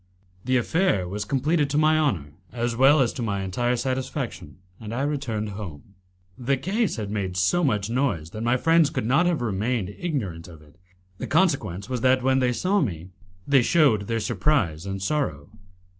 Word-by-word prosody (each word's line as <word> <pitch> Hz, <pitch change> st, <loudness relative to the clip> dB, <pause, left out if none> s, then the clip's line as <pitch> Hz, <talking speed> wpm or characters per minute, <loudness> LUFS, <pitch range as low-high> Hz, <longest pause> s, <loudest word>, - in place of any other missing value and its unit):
The 130 Hz, 0 st, +2 dB
affair 120 Hz, -, +1 dB
was 100 Hz, +3 st, -4 dB
completed 145 Hz, +5 st, +1 dB
to 145 Hz, -, -1 dB
my 155 Hz, +1 st, +4 dB
honour 85 Hz, -, -1 dB, 0.2 s
as 120 Hz, -1 st, -2 dB
well 135 Hz, +4 st, +5 dB
as 120 Hz, -, +1 dB
to -, -, -6 dB
my 100 Hz, -4 st, -2 dB
entire 120 Hz, +6 st, 0 dB
satisfaction, 130 Hz, -, -4 dB, 0.2 s
and 110 Hz, +1 st, -6 dB
I 130 Hz, -, -1 dB
returned 130 Hz, -8 st, -2 dB
home. 95 Hz, -4 st, -9 dB, 0.5 s
The 135 Hz, +2 st, 0 dB
case 200 Hz, -, -1 dB
had 105 Hz, -3 st, -5 dB
made 95 Hz, -4 st, -3 dB
so 175 Hz, -, +2 dB
much 105 Hz, -9 st, +1 dB
noise 115 Hz, -, -1 dB
that 110 Hz, -, -6 dB
my 120 Hz, +2 st, +2 dB
friends 165 Hz, +1 st, +4 dB
could -, -, -3 dB
not 140 Hz, +9 st, +3 dB
have 165 Hz, -8 st, 0 dB
remained 105 Hz, -1 st, -1 dB
ignorant 100 Hz, -, -4 dB
of 80 Hz, -3 st, -13 dB
it; 75 Hz, +3 st, -22 dB, 0.4 s
the -, -, -4 dB
consequence 135 Hz, -, +1 dB
was 125 Hz, -2 st, -3 dB
that, 130 Hz, 0 st, +3 dB
when 130 Hz, 0 st, +3 dB
they 125 Hz, -1 st, +2 dB
saw 190 Hz, +10 st, +1 dB
me, 90 Hz, -, -3 dB, 0.4 s
they 140 Hz, -2 st, +5 dB
shewed 120 Hz, -, +3 dB
their 115 Hz, -1 st, -1 dB
surprise 100 Hz, -, 0 dB
and 95 Hz, 0 st, -4 dB
sorrow. 95 Hz, -, -2 dB
120 Hz, 185 wpm, -24 LUFS, 100-140 Hz, 0.5 s, well